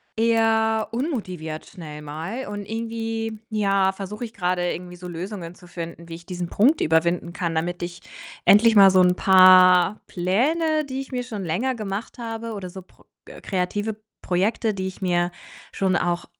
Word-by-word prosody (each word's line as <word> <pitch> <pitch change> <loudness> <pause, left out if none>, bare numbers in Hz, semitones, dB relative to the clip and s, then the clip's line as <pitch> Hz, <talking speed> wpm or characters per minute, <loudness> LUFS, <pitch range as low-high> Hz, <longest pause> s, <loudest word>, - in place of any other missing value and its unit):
eher 225 -1 +2
unmotiviert 185 - -4
schnell 150 -5 -10
mal 165 - -5
und 205 0 -5
irgendwie, 225 -1 -4
ja, 195 -3 +2
versuche 200 +4 -7
ich 225 - -11
grade 180 -1 0
irgendwie 180 0 -7
so 180 0 -9
Lösungen 175 0 -6
zu 180 - -16
finden, 170 -1 -8
wie 165 - -8
ich 170 +1 -11
diesen 180 -1 -4
Punkt 270 +10 +3
überwinden 170 +2 +1
kann, 170 -3 -2
damit 175 +2 -2
ich 175 +1 -6 0.4
endlich 220 +2 +6
mal 195 -2 +8
so 185 - +5
'n 180 0 +4
paar 185 0 +6
Pläne, 305 - 0
die 265 0 -4
ich 270 - -10
mir 250 -1 -2
schon 215 -5 -6
länger 205 +11 -1
gemacht 215 +1 -6
habe 230 -1 -5
oder 195 -3 -6
so 190 +1 -10
Pro - - -26 0.2
äh, - - -12
kreative 205 +3 -2 0.3
Projekte, 210 +4 0
die 190 -1 -3
ich 190 - -9
mir 175 -1 +1 0.4
schon 190 -2 0
auch 175 0 -1
190 Hz, 170 wpm, -23 LUFS, 175-225 Hz, 0.4 s, mal